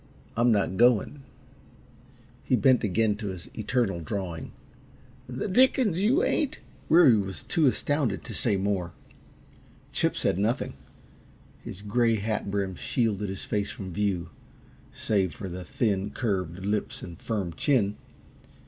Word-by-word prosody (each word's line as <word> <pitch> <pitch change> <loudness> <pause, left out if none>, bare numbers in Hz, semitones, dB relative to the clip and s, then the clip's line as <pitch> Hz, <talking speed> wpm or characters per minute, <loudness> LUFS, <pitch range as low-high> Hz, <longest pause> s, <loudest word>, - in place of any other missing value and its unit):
I'm 120 +1 +4
not 100 -3 +1
going." 120 +4 +3 1.2
He 130 - +2
bent 130 -1 +4
again 105 +1 +1
to 105 -1 -5
his 90 -3 -7
eternal 110 -4 0
drawing. 85 -2 -4 0.8
"The 130 +7 -3
dickens 210 -3 +4
you 260 - +3
ain't!" 295 - +1 0.3
Weary 155 -9 +7
was 95 -6 -4
too 160 -4 +2
astounded 135 -4 0
to 115 - -7
say 105 -1 +1
more. 95 -3 -1 1.0
Chip - - +1
said 90 - 0
nothing. 110 +5 0 0.9
His 100 - -8
gray 115 +2 +2
hat 105 -1 -2
brim 100 -1 -1
shielded 105 0 -1
his 95 - -5
face 105 -1 -1
from 95 -3 -7
view, 95 -3 -1 0.6
save 95 -7 0
for 100 - -6
the 90 0 -6
thin, 100 -1 -1
curved 95 -5 -2
lips 105 +1 -2
and 85 -2 -9
firm 100 -7 -2
chin. 105 - +1
105 Hz, 135 wpm, -27 LUFS, 95-125 Hz, 1.2 s, Weary